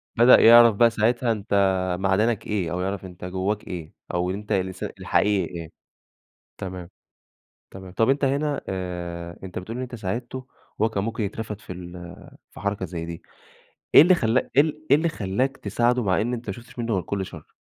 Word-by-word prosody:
بدأ 120 +2 +7
يعرف 115 -1 +8
بقى 120 +3 +5
ساعتها 115 +2 +1
أنت 105 -1 -3 0.5
معدنك 100 +3 +1
إيه، 95 -6 -1
أو 90 +1 -2
يعرف 95 0 -3
أنت 90 -1 -9
جواك 95 +3 -2
إيه، 85 -4 -7 0.2
أو 90 +1 0
إن 95 - -2
أنت 105 0 -8
الإنسا 95 -1 -1
الحقيقي 100 -3 +1
إيه. 80 -1 -8 0.9
تمام. 90 -2 -7 0.8
تمام، 95 -1 -10
طب 115 +4 +2
أنت 140 +1 +1
هِنا 140 +2 0
آآ 85 -2 -5
أنت 95 -2 -6
بتقول 110 +6 -6
إن 130 - -3
أنت 125 -1 -7
ساعدته 120 +5 -5 0.3
وهو 110 - +3
كان 100 -2 -2
ممكن 115 -1 -2
يترفد 105 +1 -5
في 100 - -9
ال 90 -1 -9 0.6
في - - -12
حركة 100 -1 -2
زي 85 -1 -5
دي، 85 +1 -7 0.7
إيه - - +12
اللي 180 +3 +6
خلّا 120 -4 +1
إيه 140 - +7 0.3
إيه 140 - +9
اللي 165 +2 +1
خلّاك 125 +5 -2
تساعده 120 +1 +1
مع 95 -1 +2
إن 120 +3 -1
أنت 120 -1 -6
ما - - -2
شُفتش 120 +3 -13
منُه 115 -1 -1
غير 95 - +1
كل 100 0 -3
شر؟ - - -12
105 Hz, 190 wpm, -24 LUFS, 95-120 Hz, 0.9 s, إيه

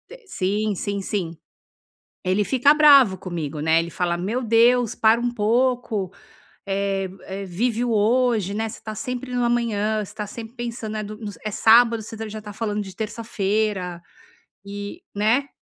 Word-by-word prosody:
te - - -19
sim, 210 - -1
sim, 200 +2 -3
sim. 190 -4 -2 0.9
Ele 190 +2 +1
fica 270 +4 +4
bravo 280 -10 +6
comigo, 165 -5 -5
né, 160 +2 +3
ele 165 0 -2
fala: 175 0 -1
"Meu 210 +8 -2
Deus, 235 0 +3
para 225 -1 +4
um 240 0 -1
pouco! 230 -3 0 0.6
Eh 195 -1 -1 0.2
eh, 195 +1 -6
vive 230 +6 -1
o - - -1
hoje, 220 -2 +2
né, 220 +1 -1
você 220 - -10
tá 215 - -6
sempre 250 +3 -5
no 245 -1 +1
amanhã. 220 -3 0
Você - - -12
tá 210 - -4
sempre 225 +2 -9
pensando, 235 -3 -5
né, 215 0 -3
do 210 +1 -7
nos 210 -5 -8
É 215 - -3
sábado, 230 +2 +5
você 225 0 -7
já 215 0 -7
tá 210 -1 -8
falando 210 0 -2
de 190 -2 -9
terça-feira", 210 -4 -2 0.6
e 205 - -7
né. 225 +7 +2
215 Hz, 170 wpm, -23 LUFS, 200-235 Hz, 0.9 s, bravo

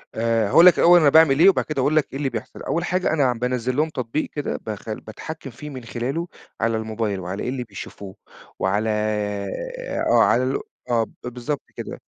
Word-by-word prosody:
آآ، 115 -1 +1
هاقول 170 - +7
لك 180 - +8
الأول 175 +1 +7
أنا 150 -3 +5
باعمل 150 -2 +5
إيه 180 +4 +8
وبعد 195 - +1
كده 150 -3 -2
هاقول 145 +4 +2
لك 155 - +3
إيه - - -5
اللي 140 -1 -1
بيحصل. 120 0 -7
أول 170 - -1
حاجة 180 -2 0
أنا 135 -5 +3
بانزل 125 +1 -2
لهم 155 +3 +1
تطبيق 135 +1 -3
كده 145 - -3
بخ 110 0 -6
بتحكم 135 +8 -7
فيه 140 +5 -9
من 130 -3 -8
خلاله 130 +9 -3 0.3
على 115 0 +1
الموبايل 110 -2 -2
وعلى 95 +2 -5
إيه - - -2
اللي 130 -1 -3
بيشوفوه، 100 -2 -9 0.4
وعلى 105 +4 0 1.2
آه، - - +6
على 125 - +3
ال 130 +2 0 0.3
آه، 115 -2 +3
ب - - -10
بالضبط 125 +4 -4
كده. - - -7
125 Hz, 200 wpm, -23 LUFS, 110-150 Hz, 1.2 s, لك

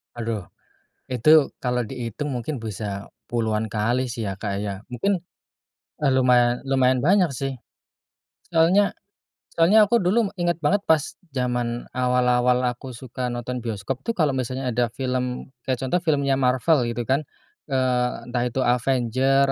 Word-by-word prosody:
Aduh! 115 -5 -4 0.6
itu 145 +5 +5
kalau 125 -1 0
dihitung 125 +4 -5
mungkin 125 0 -4
bisa 100 -2 -5 0.2
puluhan 110 -2 -1
kali 120 +5 0
sih 120 -1 -5
ya 95 - -6
Kak 100 -1 -3
ya, 100 -2 -4
mungkin, 155 - 0 0.8
eee, 150 - +1
lumayan 125 -1 +3
lumayan 130 -1 +2
banyak 185 +1 +4
sih. 135 -2 -4 0.9
Soalnya 180 +5 +4 0.6
soalnya 200 +6 +5
aku 235 +3 +3
dulu 200 +3 +2
inget 175 -1 +1
banget 205 +1 +3
pas 160 -3 +1 0.2
zaman 120 -1 -1
awal-awal 125 0 +2
aku 125 0 -9
suka 125 0 -5
nonton 120 +1 -4
bioskop 115 +2 -4
tuh 230 - 0
kalau 155 -5 +2
misalnya 130 0 -2
ada 120 +1 +1
film 125 0 -3 0.2
kayak 130 - +2
contoh 155 +8 +1
filmnya 140 -5 +1
Marvel 130 +1 +2
gitu 120 +1 -2
kan, 135 +4 +1 0.5
eee, 130 -3 +1 0.2
entah 120 -1 0
itu 130 +2 -1
Avengers 130 +2 +2
125 Hz, 140 wpm, -24 LUFS, 120-140 Hz, 0.9 s, itu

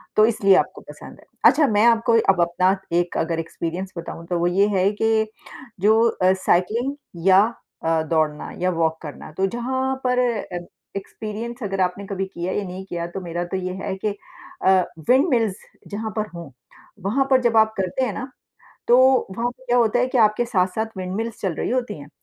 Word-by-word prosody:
तो 215 - +6
इसलिए 200 -4 +4
आपको - - 0
पसंद - - -11
है। - - -19 0.3
अच्छा 300 -3 +3
मैं 215 - +5
आपको 230 0 +3 0.2
अब 175 - 0
अपना 180 +3 +2 0.2
एक 175 0 0
अगर 165 0 -1
एक्सपीरियंस 170 +3 -5
बताऊँ 165 0 -7
तो 175 -1 -1
वो 175 - +2
ये 195 +3 +3
है 185 +1 +3
कि 220 -1 +2 0.5
जो 220 +3 +4
अ, 185 -3 +2
साइक्लिंग 215 +9 +1 0.3
या 190 +1 +7 0.4
अ, 165 -1 +2
दौड़ना 155 -2 0
या 185 - +2
वॉक 165 -2 0
करना, 150 0 -9
तो 190 +5 0
जहाँ 260 +4 -2
पर 250 -1 +2
अ, 235 -7 -1 0.4
एक्सपीरियंस 220 +5 -6
अगर 195 -2 -2
आपने 185 +2 -1
कभी 195 -1 -2
किया 180 -1 -4
या 205 - -1
नहीं 185 +1 -7
किया 170 -2 -4
तो 175 +3 -6
मेरा 175 0 -3
तो 190 - 0
ये 185 0 -3
है 195 - -2
कि - - +3 0.6
अ, - - +6 0.4
विंड 265 +6 +5
मिल्स 225 -6 +1 0.3
जहाँ 215 +1 -4
पर 215 - -1
हो, 170 -5 -9 0.5
वहाँ 270 +7 +2
पर 260 -1 +5
जब 235 -2 +2
आप 220 0 +4
करते 190 +7 0
हैं 215 - -3
ना, 255 +5 -6 0.6
तो 240 - +7 0.4
वहाँ 240 +1 0
पे 255 +1 -18
क्या 245 - +2
होता 235 0 +3
है 250 - +3
कि 250 - +4
आपके 215 +2 +4
साथ-साथ 220 -1 0
विंड 185 0 -4
मिल्स 225 0 -4
चल 185 -5 -1
रही - - -3
होती 240 -8 -2
हैं। 145 - -11
195 Hz, 200 wpm, -22 LUFS, 180-230 Hz, 0.6 s, या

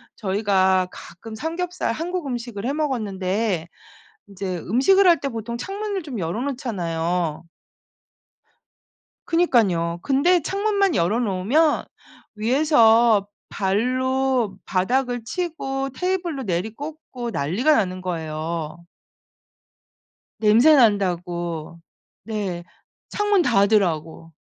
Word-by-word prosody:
저희가 190 -2 +2
가끔 220 +6 -11
삼겹살 340 +6 -3
한국 345 +6 -3
음식을 240 -4 -5
해 260 - 0
먹었는데 205 - -1 0.6
인제 190 -2 -4
음식을 270 - +3
할 340 -4 +5
때 280 - -2
보통 235 -1 -5
창문을 395 - -4
좀 275 -7 -6
열어 175 +5 -2
놓잖아요. 175 - -2 1.8
그러니깐요. 200 - +2
근데 335 +6 +3
창문만 400 - 0
열어 195 +6 +1
놓으면 240 - +1 0.5
위에서 230 -3 +4 0.2
발로 250 +2 0
바닥을 245 +5 0
치고 270 -2 -3
테이블로 345 -1 -2
내리꽂고 240 - -5
난리가 200 - +1
나는 185 -5 -1
거예요. 165 -1 -4 1.6
냄새 230 +8 +6
난다고. 175 - 0 0.4
네. 200 -6 -4 0.5
창문 415 -2 +2
닫으라고. 195 - +1
225 Hz, 220 characters per minute, -22 LUFS, 185-280 Hz, 1.8 s, 냄새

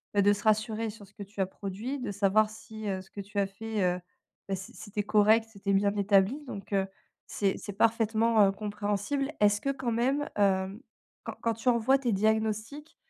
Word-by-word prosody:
bah, 200 - +4
de 205 +1 +5
se 205 - -5
rassurer 220 +1 +1
sur 205 -1 -11
ce 195 - -23
que 205 - -12
tu 200 0 -6
as - - +3
produit. 205 +8 -5
De 245 -5 -4
savoir 205 +2 +3
si, 220 0 -9
heu, 190 -1 -2
ce - - -23
que 200 - -6
tu 205 +1 -10
as 200 - +3
fait, 210 +1 -3
heu, 180 0 +1 0.5
bah, 195 - -1
c'est 190 +1 -9
c'était 210 -1 -4
correct, 215 +2 +4
c'était 200 -1 -2
bien 200 +1 +2
établi 200 +7 +3
donc 200 -3 -7
heu, 195 -1 +2 0.4
c'est 195 -2 0
c'est 205 - -7
parfaitement, 225 0 +3
heu, - - +2
compréhensible. 210 +7 -2
Est-ce 205 0 +4
que 275 - -1
quand 255 -3 -3
même, 265 +6 +1
hem, 195 0 +1 0.4
quand - - -6
quand 230 -1 +1
tu 230 +3 0
envoies 245 +3 +3
tes 245 -5 0
diagnostics, 220 +7 -1
210 Hz, 205 wpm, -29 LUFS, 200-225 Hz, 0.5 s, de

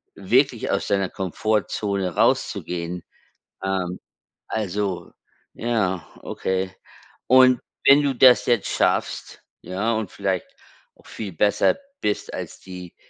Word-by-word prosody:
wirklich 120 +5 +2
aus - - 0
deiner 100 -2 +1
Komfortzone 100 -1 -1
rauszugehen. 90 0 0 0.6
Ähm, 95 -2 -1 0.5
also 100 -4 -2 0.4
ja, 100 -8 -1
okay. 95 0 -2 0.5
Und 130 -1 +6 0.3
wenn 140 +1 +8
du 140 -2 0
das 125 0 +7
jetzt 120 -5 +1
schaffst, - - -1 0.2
ja, 100 +5 -1
und 110 -3 -3
vielleicht 95 -3 -2 0.5
auch - - -24
viel 100 -4 -6
besser 100 +5 +3 0.3
bist 105 - -2
als - - -7
die, 90 -2 -10
100 Hz, 110 wpm, -23 LUFS, 95-115 Hz, 0.6 s, wenn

